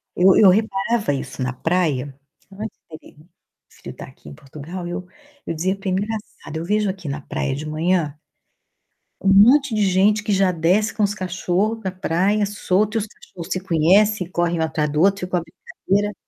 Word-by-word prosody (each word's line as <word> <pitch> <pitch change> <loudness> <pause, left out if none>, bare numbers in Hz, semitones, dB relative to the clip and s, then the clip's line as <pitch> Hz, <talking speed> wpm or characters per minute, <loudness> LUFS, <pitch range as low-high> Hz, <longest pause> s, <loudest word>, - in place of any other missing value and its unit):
eu 185 +1 +5
eu 200 - +7
reparava 205 -2 +1
isso 135 -1 -5
na 125 0 -2
praia 145 -4 -1 0.4
antes 210 +3 -8
dele 155 0 -13
meu 155 +3 -20 0.4
filho - - -11
tá - - -8
aqui - - -15
em - - -10
Portugal, 155 - -8
eu 180 +1 -5 0.4
eu - - -3
dizia: 185 +4 -1
"Que 195 -1 -5
engraçado, 205 -4 -4
eu 165 - -4
vejo 210 +2 +1
aqui 185 -4 -6
na 145 +1 -4
praia 135 0 -3
de 150 +2 -6
manhã" 155 -1 0 1.0
"um 195 - +3
monte 255 +6 +6
de 215 - 0
gente 205 +3 +3
que 210 - -2
já 190 -1 +3
desce 180 +6 +1
com 215 - 0
os 205 0 +1
cachorros 190 +3 -1
pra 190 -4 -4
praia, 190 +3 0
solto 205 +2 0
e - - +2
os 215 - -4
cachorro 180 -4 -12
se 185 - 0
conhecem, 185 +2 +2
correm 175 -1 0
um - - +1
atrás 155 -2 -1
do 150 +2 0
outro 195 +1 +3
fica 180 0 -1
uma 170 - -2
brincadeira" 200 +5 -3
185 Hz, 190 wpm, -21 LUFS, 160-205 Hz, 1.0 s, eu